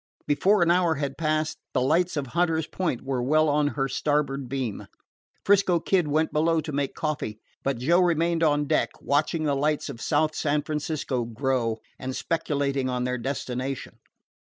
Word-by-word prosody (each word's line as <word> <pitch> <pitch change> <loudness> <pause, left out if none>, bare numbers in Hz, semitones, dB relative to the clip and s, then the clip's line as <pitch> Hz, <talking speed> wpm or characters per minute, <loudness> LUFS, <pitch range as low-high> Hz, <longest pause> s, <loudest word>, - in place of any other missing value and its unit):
Before 185 +6 +3
an 170 - +3
hour 175 -2 +3
had 140 -1 -3
passed, 155 0 -1 0.2
the 130 - +3
lights 165 +6 +2
of 145 - -1
Hunter's 165 -2 +1
Point 160 -6 -2
were 130 -2 -1
well 155 +5 +3
on 145 0 +2
her 135 -1 +1
starboard 140 -1 -1
beam. 130 -6 -3 0.6
'Frisco 195 -3 +4
Kid 180 -1 +1
went 155 +2 +1
below 165 +2 +2
to 155 0 -4
make 140 -1 -2
coffee, 150 -9 -3 0.2
but 135 -2 -1
Joe 165 +9 +3
remained 170 -1 +2
on 150 -2 +3
deck, - - +1
watching 155 +3 0
the 145 -2 +1
lights 150 +2 0
of 120 -4 -8
South 155 0 +1
San 150 0 0
Francisco 150 -4 -2
grow, 115 -1 -1 0.2
and 130 0 -4
speculating 140 -5 -1
on 125 -1 -1
their 125 0 -1
destination. 130 0 -4
145 Hz, 170 wpm, -26 LUFS, 135-160 Hz, 0.6 s, Frisco